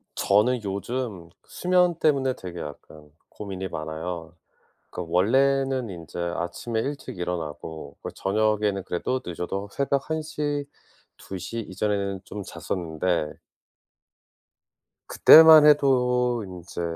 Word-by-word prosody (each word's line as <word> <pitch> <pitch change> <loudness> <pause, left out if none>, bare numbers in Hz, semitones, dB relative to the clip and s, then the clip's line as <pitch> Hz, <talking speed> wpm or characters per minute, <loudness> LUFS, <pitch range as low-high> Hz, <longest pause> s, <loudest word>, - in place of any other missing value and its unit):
저는 110 +4 +2
요즘 100 -2 -4 0.2
수면 180 -1 +2
때문에 135 -4 +2
되게 90 -2 -8
약간 75 0 -10 0.2
고민이 95 -2 -6
많아요. 80 +2 -6 0.6
그러니까 85 -2 -7
원래는 130 +5 +2
인제 85 -1 -8
아침에 85 +6 -3
일찍 140 -5 -5
일어나고 80 -4 -5
그리고 - - -6
저녁에는 105 -1 0
그래도 125 +8 -2
늦어도 95 +3 -4
새벽 140 0 -1
1:00, 150 -2 -2 0.5
2:00 95 +5 -6
이전에는 100 0 -2
좀 105 +1 -7
잤었는데 85 -3 -3 1.7
그때만 160 -1 +9
해도 125 -5 +3
인제 90 -2 -8
100 Hz, 240 characters per minute, -25 LUFS, 90-130 Hz, 1.7 s, 그때만